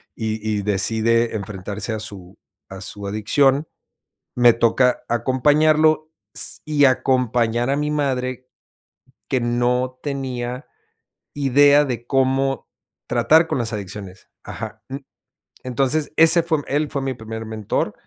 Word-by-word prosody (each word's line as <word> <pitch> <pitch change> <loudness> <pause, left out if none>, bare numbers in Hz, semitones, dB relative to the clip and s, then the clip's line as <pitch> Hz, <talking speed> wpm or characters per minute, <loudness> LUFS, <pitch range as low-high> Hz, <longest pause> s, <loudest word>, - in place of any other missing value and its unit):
y 110 -1 -3 0.2
y - - -2
decide 110 +4 +1
enfrentarse 100 +1 -5
a 110 - -3
su 100 -4 -10 0.3
a 95 - -9
su 100 +1 -6
adicción, 135 +8 +1 0.7
me 120 -1 +6
toca 120 +2 +2
acompañarlo 155 +5 +2 0.2
s - - -2
y 150 -2 +3
acompañar 125 -2 +1
a 140 - +2
mi 150 +1 -1
madre 130 -3 -2 0.8
que 130 - 0
no 125 +2 0
tenía 130 -2 -4 0.7
idea 145 +1 +4
de 120 -4 -5
cómo 135 0 0 0.4
tratar 125 +8 +4
con 160 - -2
las 115 -1 -2
adicciones. 100 -2 -8
Ajá, - - -8
mm, 135 - -5 0.7
entonces, 135 +4 0
ese 165 +1 +6
fue 160 -2 0
él 145 +2 -1
fue 140 - -3
mi 135 -1 -2
primer 110 -1 -7
mentor. 110 -2 -2
125 Hz, 125 wpm, -21 LUFS, 110-140 Hz, 0.8 s, me